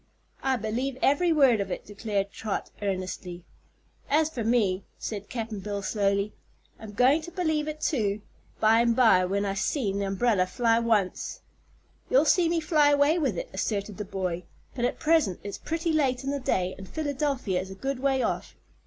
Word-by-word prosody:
"I 265 Hz, -1 st, +1 dB
believe 245 Hz, +4 st, -2 dB
ev'ry 310 Hz, +5 st, +3 dB
word 270 Hz, -9 st, +5 dB
of 195 Hz, -, -4 dB
it!" -, -, -5 dB
declared 200 Hz, -1 st, -2 dB
Trot, 215 Hz, -3 st, -4 dB
earnestly. 185 Hz, -2 st, -4 dB, 0.7 s
"As 310 Hz, +2 st, +3 dB
fer 240 Hz, -7 st, -3 dB
me," 210 Hz, -5 st, +2 dB
said 205 Hz, -2 st, -5 dB
Cap'n 225 Hz, -3 st, -4 dB
Bill 200 Hz, 0 st, -4 dB
slowly, 200 Hz, 0 st, 0 dB, 0.5 s
"I'm 215 Hz, -1 st, -9 dB
goin' 260 Hz, +8 st, +4 dB
to 330 Hz, -, -8 dB
believe 315 Hz, -5 st, 0 dB
it, 305 Hz, 0 st, -4 dB
too, 210 Hz, -7 st, 0 dB, 0.4 s
by'm'by, 225 Hz, -3 st, +5 dB
when 200 Hz, +2 st, 0 dB
I've 195 Hz, 0 st, -2 dB
seen 200 Hz, -8 st, -1 dB
the 200 Hz, -, -1 dB
umbrel 195 Hz, 0 st, +2 dB
fly 230 Hz, +4 st, +2 dB
once." 220 Hz, -5 st, 0 dB, 0.7 s
"You'll -, -, +4 dB
see 350 Hz, -3 st, +4 dB
me 335 Hz, 0 st, +1 dB
fly 310 Hz, -2 st, +3 dB
away 290 Hz, +4 st, +4 dB
with 260 Hz, -, 0 dB
it," -, -, -5 dB
asserted 200 Hz, +1 st, -2 dB
the 210 Hz, -, -3 dB
boy. 185 Hz, -3 st, -3 dB, 0.3 s
"But 240 Hz, -2 st, -1 dB
at -, -, -1 dB
present 310 Hz, -, +2 dB
it's 200 Hz, -, -6 dB
pretty 330 Hz, 0 st, -2 dB
late 270 Hz, -4 st, +1 dB
in 275 Hz, -, -2 dB
the 285 Hz, -, -2 dB
day, 185 Hz, -7 st, 0 dB
and 190 Hz, -, -10 dB
Philadelphia 280 Hz, -, -1 dB
is 190 Hz, -, -8 dB
a 190 Hz, -, -8 dB
good 270 Hz, +5 st, -3 dB
way 265 Hz, -1 st, +1 dB
off. -, -, -3 dB
225 Hz, 180 wpm, -27 LUFS, 200-285 Hz, 0.7 s, word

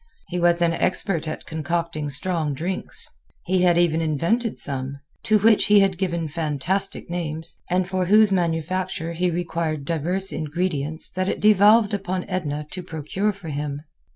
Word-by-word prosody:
He 180 Hz, -, -2 dB
was 175 Hz, 0 st, +3 dB
an 165 Hz, -1 st, +3 dB
expert 170 Hz, -2 st, 0 dB
at 155 Hz, -, -5 dB
concocting 160 Hz, -1 st, -2 dB
strong 155 Hz, 0 st, -1 dB
drinks. 180 Hz, +6 st, -3 dB, 0.4 s
He 185 Hz, 0 st, +2 dB
had 175 Hz, -1 st, +4 dB
even 165 Hz, -2 st, +3 dB
invented 170 Hz, -, 0 dB
some, 135 Hz, 0 st, -4 dB, 0.3 s
to 215 Hz, -, +5 dB
which 215 Hz, +1 st, +4 dB
he 210 Hz, -1 st, +6 dB
had 190 Hz, -2 st, +1 dB
given 170 Hz, -4 st, -1 dB
fantastic 165 Hz, +5 st, -2 dB
names, 165 Hz, -1 st, -4 dB
and 180 Hz, +1 st, +1 dB
for 185 Hz, -1 st, -1 dB
whose 210 Hz, +1 st, +6 dB
manufacture 170 Hz, 0 st, -1 dB
he 180 Hz, +2 st, +1 dB
required 165 Hz, -3 st, -2 dB
diverse 175 Hz, +5 st, 0 dB
ingredients 155 Hz, -1 st, -1 dB
that 185 Hz, +1 st, -1 dB
it -, -, -2 dB
devolved 210 Hz, +1 st, +5 dB
upon 185 Hz, -2 st, -2 dB
Edna 150 Hz, -5 st, -3 dB
to 185 Hz, -, -5 dB
procure 175 Hz, +5 st, -2 dB
for 195 Hz, -5 st, -9 dB
him. 145 Hz, 0 st, -4 dB
175 Hz, 155 wpm, -23 LUFS, 155-185 Hz, 0.4 s, he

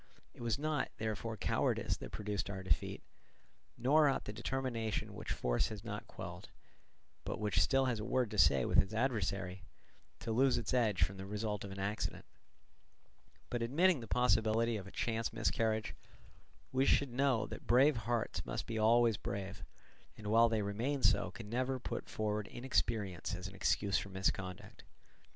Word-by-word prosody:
It -, -, -13 dB
was 115 Hz, -2 st, 0 dB
not, 150 Hz, -2 st, -1 dB
therefore, 110 Hz, 0 st, -3 dB
cowardice 95 Hz, -, 0 dB
that -, -, -8 dB
produced 105 Hz, -1 st, -3 dB
our 95 Hz, -1 st, -5 dB
defeat, 80 Hz, -4 st, -1 dB, 0.7 s
nor 145 Hz, +4 st, +5 dB
ought 135 Hz, -, -1 dB
the 105 Hz, -, -5 dB
determination 115 Hz, -2 st, -2 dB
which -, -, -6 dB
force -, -, +1 dB
has -, -, -7 dB
not -, -, -6 dB
quelled, -, -, -8 dB, 0.7 s
but -, -, -4 dB
which 105 Hz, -1 st, +2 dB
still 135 Hz, -1 st, +3 dB
has 125 Hz, -4 st, 0 dB
a -, -, -4 dB
word 125 Hz, -1 st, 0 dB
to 105 Hz, -, -1 dB
say 70 Hz, -5 st, +5 dB
with -, -, +4 dB
its 100 Hz, +3 st, +2 dB
adversary, 100 Hz, -6 st, -1 dB, 0.6 s
to 115 Hz, -, -3 dB
lose 130 Hz, +3 st, +4 dB
its 120 Hz, +1 st, -2 dB
edge 110 Hz, -8 st, +3 dB
from 95 Hz, +3 st, -1 dB
the 95 Hz, -, -6 dB
result 105 Hz, 0 st, -3 dB
of 100 Hz, -, -6 dB
an 95 Hz, -, -8 dB
accident; 100 Hz, +2 st, -3 dB, 1.3 s
but 120 Hz, -, -1 dB
admitting 155 Hz, +7 st, +3 dB
the 115 Hz, -, -8 dB
possibility 115 Hz, 0 st, +2 dB
of 100 Hz, -3 st, -5 dB
a -, -, -10 dB
chance 115 Hz, -1 st, -1 dB
miscarriage, 110 Hz, -1 st, 0 dB, 0.8 s
we 130 Hz, +1 st, +2 dB
should 140 Hz, -1 st, +3 dB
know 130 Hz, -3 st, +2 dB
that -, -, -9 dB
brave 130 Hz, +4 st, +5 dB
hearts 115 Hz, 0 st, -1 dB
must -, -, -4 dB
be 115 Hz, -1 st, -3 dB
always 115 Hz, 0 st, +4 dB
brave, 100 Hz, -2 st, -5 dB, 0.5 s
and 110 Hz, -, -11 dB
while 115 Hz, +2 st, +5 dB
they 110 Hz, -2 st, 0 dB
remain 120 Hz, +8 st, -2 dB
so 100 Hz, -2 st, +4 dB
can 105 Hz, +3 st, -9 dB
never 130 Hz, +3 st, -1 dB
put -, -, -5 dB
forward 105 Hz, -1 st, -2 dB
inexperience 110 Hz, -7 st, -1 dB
as 90 Hz, +1 st, -6 dB
an 100 Hz, -, -10 dB
excuse 100 Hz, +1 st, +1 dB
for 100 Hz, -, -7 dB
misconduct. 95 Hz, -1 st, -3 dB
110 Hz, 170 wpm, -35 LUFS, 100-120 Hz, 1.3 s, nor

